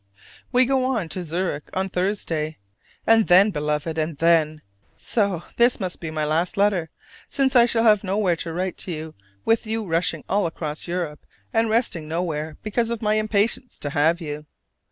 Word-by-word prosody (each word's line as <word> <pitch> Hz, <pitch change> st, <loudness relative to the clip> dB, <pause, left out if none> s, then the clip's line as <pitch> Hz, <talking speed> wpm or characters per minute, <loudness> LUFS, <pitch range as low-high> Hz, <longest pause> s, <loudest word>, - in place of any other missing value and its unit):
We 255 Hz, 0 st, +5 dB
go 265 Hz, 0 st, +1 dB
on 225 Hz, -10 st, -1 dB
to 185 Hz, -, -2 dB
Zurich 170 Hz, -2 st, -3 dB
on 190 Hz, +1 st, 0 dB
Thursday, 180 Hz, -5 st, -2 dB, 0.5 s
and 225 Hz, -1 st, +5 dB
then, 190 Hz, +4 st, +6 dB
Beloved, 150 Hz, 0 st, -2 dB
and 155 Hz, -1 st, -2 dB
then! 155 Hz, -2 st, +2 dB, 0.3 s
so 200 Hz, -6 st, 0 dB
this 240 Hz, +1 st, +4 dB
must 185 Hz, -3 st, -4 dB
be 165 Hz, -, -5 dB
my 155 Hz, -1 st, -2 dB
last 165 Hz, +5 st, 0 dB
letter, 195 Hz, -5 st, +2 dB, 0.4 s
since 270 Hz, -1 st, +1 dB
I 240 Hz, -1 st, +7 dB
shall 230 Hz, -1 st, +1 dB
have 215 Hz, -3 st, +5 dB
nowhere 195 Hz, -2 st, +1 dB
to 165 Hz, -, -4 dB
write 180 Hz, +2 st, -3 dB
to 160 Hz, -3 st, -6 dB, 0.3 s
with 225 Hz, -1 st, +2 dB
you 220 Hz, 0 st, -2 dB
rushing 170 Hz, 0 st, 0 dB
all 200 Hz, -2 st, +1 dB
across 155 Hz, -1 st, -5 dB
Europe 170 Hz, -4 st, -3 dB, 0.3 s
and 225 Hz, 0 st, +2 dB
resting 215 Hz, -9 st, 0 dB
nowhere 160 Hz, -2 st, -3 dB
because 230 Hz, +2 st, 0 dB
of 235 Hz, -1 st, -3 dB
my 210 Hz, 0 st, +2 dB
impatience 215 Hz, +4 st, 0 dB
to 145 Hz, -, -4 dB
have 160 Hz, +4 st, +2 dB
you. 150 Hz, -2 st, -6 dB
180 Hz, 175 wpm, -23 LUFS, 160-215 Hz, 0.5 s, I